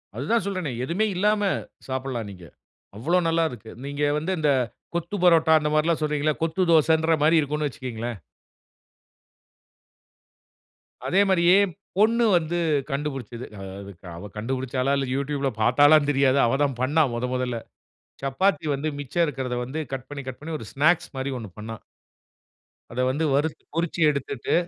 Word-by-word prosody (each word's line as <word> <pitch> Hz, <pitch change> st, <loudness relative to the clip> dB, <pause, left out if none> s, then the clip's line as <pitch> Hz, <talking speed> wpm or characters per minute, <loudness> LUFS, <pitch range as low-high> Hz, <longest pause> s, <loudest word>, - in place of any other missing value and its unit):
அதுதா 145 Hz, -, +1 dB
சொல்றேனே. 185 Hz, -8 st, -2 dB
எதுவுமே 180 Hz, +10 st, 0 dB
இல்லாம 210 Hz, +3 st, +2 dB, 0.5 s
சாப்புட்லாம் 130 Hz, -5 st, -3 dB
நீங்க. 90 Hz, -3 st, -12 dB, 0.5 s
அவ்ளோ 165 Hz, +11 st, +1 dB
நல்லாருக்கு. 160 Hz, -10 st, -1 dB
நீங்க 145 Hz, +1 st, -3 dB, 0.2 s
வந்து 165 Hz, +5 st, -3 dB
இந்த 150 Hz, -2 st, +3 dB, 0.4 s
கொத்து 170 Hz, +4 st, -2 dB
பரோட்டா 160 Hz, -2 st, +6 dB
அந்தமாரிலாம் 155 Hz, +2 st, +1 dB
சொல்றீங்கள. 150 Hz, 0 st, +1 dB
கொத்து 165 Hz, +3 st, 0 dB
தோசைன்றமாரி 160 Hz, 0 st, +4 dB
இருக்குன்னு 150 Hz, +1 st, -1 dB
வச்சுக்கங்களேன். 120 Hz, -4 st, -5 dB, 2.9 s
அதே 190 Hz, -, +3 dB
மாதிரியே 180 Hz, 0 st, +5 dB, 0.4 s
பொண்ணு 230 Hz, +3 st, +4 dB
வந்து 170 Hz, +1 st, -2 dB, 0.3 s
கண்டுபிடிச்சுது. 135 Hz, -5 st, -4 dB, 0.4 s
அதுக் 95 Hz, -3 st, -12 dB
அவ 100 Hz, +4 st, -8 dB
கண்டுபிடிச்சாளா! 130 Hz, +3 st, -1 dB
இல்ல 135 Hz, -, 0 dB
யூட்யூப் 140 Hz, 0 st, -2 dB
ல 135 Hz, -, +3 dB
பார்த்தாளான்னு 145 Hz, +4 st, +5 dB
தெரியாது. 135 Hz, -1 st, +3 dB
அவ 120 Hz, +3 st, +1 dB
தான் 135 Hz, -4 st, -1 dB
பண்ணா 150 Hz, +5 st, +3 dB
மொத 125 Hz, +2 st, -2 dB
மொதல்ல. 125 Hz, -2 st, -1 dB, 0.6 s
சப்பாத்தி 155 Hz, +4 st, +1 dB
வந்து 145 Hz, +3 st, -3 dB
மிச்சம் 145 Hz, +5 st, 0 dB
இருக்குறத 130 Hz, -5 st, -3 dB
வந்து 135 Hz, +6 st, -5 dB
கட் 130 Hz, -1 st, -5 dB
பண்ணி, 145 Hz, -1 st, -6 dB
கட் 130 Hz, -, -6 dB
பண்ணி 160 Hz, +1 st, -5 dB
1 110 Hz, -, -9 dB
ஸ்நாக்ஸ் 160 Hz, +5 st, +2 dB
மாரி 135 Hz, +1 st, -2 dB
1 110 Hz, -4 st, -7 dB
பண்ணா. 110 Hz, +1 st, -6 dB, 1.2 s
அத 125 Hz, -, -4 dB
வந்து 155 Hz, +4 st, -1 dB
வறுத் 150 Hz, +3 st, 0 dB
பொறிச்சு 170 Hz, 0 st, -2 dB
எடுத்துட்டு. 140 Hz, -3 st, -2 dB
145 Hz, 135 wpm, -25 LUFS, 130-160 Hz, 2.9 s, பரோட்டா